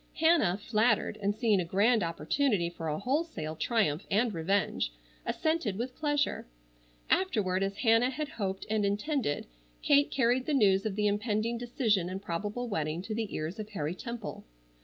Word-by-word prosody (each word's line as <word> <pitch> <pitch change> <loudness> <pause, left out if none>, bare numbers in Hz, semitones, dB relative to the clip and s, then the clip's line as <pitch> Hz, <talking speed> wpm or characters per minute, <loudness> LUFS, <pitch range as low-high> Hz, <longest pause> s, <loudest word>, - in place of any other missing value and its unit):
Hannah, 320 - +3
flattered, 215 0 +1
and 200 +1 0
seeing 220 -3 +2
a - - -1
grand 210 +7 +3
opportunity 170 - 0
for 165 -2 -6
a 150 0 -1
wholesale 255 - -2
triumph 160 -2 +1
and 215 +2 +2
revenge, 175 - 0 0.4
assented 315 - 0
with 250 +3 -4
pleasure. 290 - 0 0.6
Afterward 205 - +1
as 195 +1 -1
Hannah 230 +1 +4
had 290 +2 -4
hoped 195 -5 -3
and 215 -1 0
intended, 205 - -1 0.4
Kate 285 0 +4
carried 255 0 +1
the 300 - +1
news 200 -4 +4
of 200 - -3
the 210 0 0
impending 215 +2 0
decision 230 - 0
and 190 +1 -4
probable 205 +7 -3
wedding 160 -4 -2
to 215 - -4
the 220 -2 -3
ears 160 +7 -4
of 215 0 -5
Harry 160 -6 -3
Temple. 235 +2 -6
210 Hz, 160 wpm, -30 LUFS, 190-245 Hz, 0.6 s, Hannah